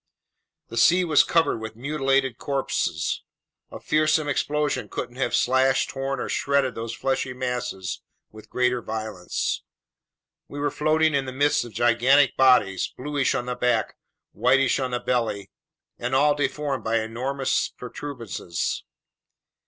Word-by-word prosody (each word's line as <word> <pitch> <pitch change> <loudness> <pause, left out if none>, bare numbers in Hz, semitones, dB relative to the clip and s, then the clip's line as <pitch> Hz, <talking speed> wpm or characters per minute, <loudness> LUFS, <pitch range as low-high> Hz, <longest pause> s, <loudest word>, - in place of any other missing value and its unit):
The 115 - -7
sea 175 +10 +5
was 155 -4 +5
covered 165 -8 +2
with 110 0 -7
mutilated 135 -1 0
corpses. 135 - -1 0.5
A - - -9
fearsome 155 0 +2
explosion 145 -5 -1
couldn't 120 - -5
have 130 -2 0
slashed, 130 +1 +2
torn, 135 0 -3
or - - -3
shredded 140 -2 +1
these 115 0 -5
fleshy 130 -1 -1
masses 125 -7 -4 0.3
with 110 0 -14
greater 125 -1 +1
violence. 110 -5 -3 0.9
We 145 - -9
were 145 0 0
floating 155 +1 +2
in 140 -1 +1
the 130 - -5
midst 145 +1 +2
of 120 - -11
gigantic 125 +4 +4
bodies, 125 -8 +3
bluish 145 0 0
on 125 -2 -2
the 125 - -2
back, 125 -3 0 0.4
whitish 125 +5 +2
on 130 -1 -1
the 125 -1 -2
belly, 115 -5 -1 0.5
and 120 +2 -1
all 145 +2 +4
deformed 145 -1 -2
by 115 0 +1
enormous 130 +5 -1
protuberances. 120 - -5
130 Hz, 135 wpm, -24 LUFS, 120-140 Hz, 0.9 s, sea